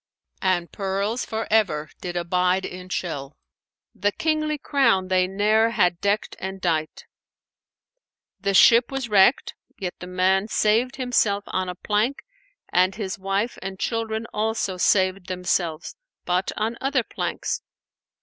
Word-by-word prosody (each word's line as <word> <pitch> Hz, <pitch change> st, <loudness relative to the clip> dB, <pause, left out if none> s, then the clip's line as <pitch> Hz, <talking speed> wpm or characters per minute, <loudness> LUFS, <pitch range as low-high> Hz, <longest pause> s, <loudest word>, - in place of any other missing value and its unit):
An 185 Hz, -3 st, +1 dB
pearls 200 Hz, +5 st, -2 dB
for 220 Hz, 0 st, -3 dB
ever 165 Hz, -9 st, +2 dB
did 175 Hz, -1 st, -5 dB
abide 180 Hz, +2 st, +1 dB
in 180 Hz, 0 st, -8 dB
shell, 145 Hz, -6 st, -4 dB, 0.3 s
* -, -, -69 dB
The 205 Hz, 0 st, 0 dB
kingly 310 Hz, +3 st, 0 dB
crown 235 Hz, -11 st, +2 dB
they 185 Hz, -1 st, +3 dB
ne'er 215 Hz, +4 st, +2 dB
had 180 Hz, -6 st, +1 dB
deckt 200 Hz, +1 st, 0 dB
and 190 Hz, +1 st, -5 dB
dight." 160 Hz, -4 st, -2 dB, 1.3 s
The 200 Hz, 0 st, 0 dB
ship 235 Hz, +6 st, +6 dB
was 270 Hz, -3 st, -3 dB
wrecked, 205 Hz, +4 st, +4 dB, 0.2 s
yet 180 Hz, -2 st, -4 dB
the 180 Hz, -, -8 dB
man 190 Hz, +2 st, +2 dB
saved 225 Hz, +4 st, +2 dB
himself 235 Hz, -6 st, +1 dB
on 185 Hz, -1 st, -2 dB
a 180 Hz, -, -5 dB
plank 215 Hz, +9 st, -1 dB, 0.5 s
and 185 Hz, +2 st, +3 dB
his 200 Hz, -3 st, -4 dB
wife 195 Hz, +5 st, -1 dB
and 190 Hz, 0 st, -6 dB
children 225 Hz, +1 st, -2 dB
also 215 Hz, -3 st, -1 dB
saved 185 Hz, 0 st, +2 dB
themselves, 180 Hz, -3 st, -2 dB, 0.3 s
but 180 Hz, +1 st, 0 dB
on 225 Hz, +2 st, -1 dB
other 270 Hz, -2 st, +1 dB
planks. -, -, -3 dB
195 Hz, 140 wpm, -24 LUFS, 185-220 Hz, 1.3 s, ship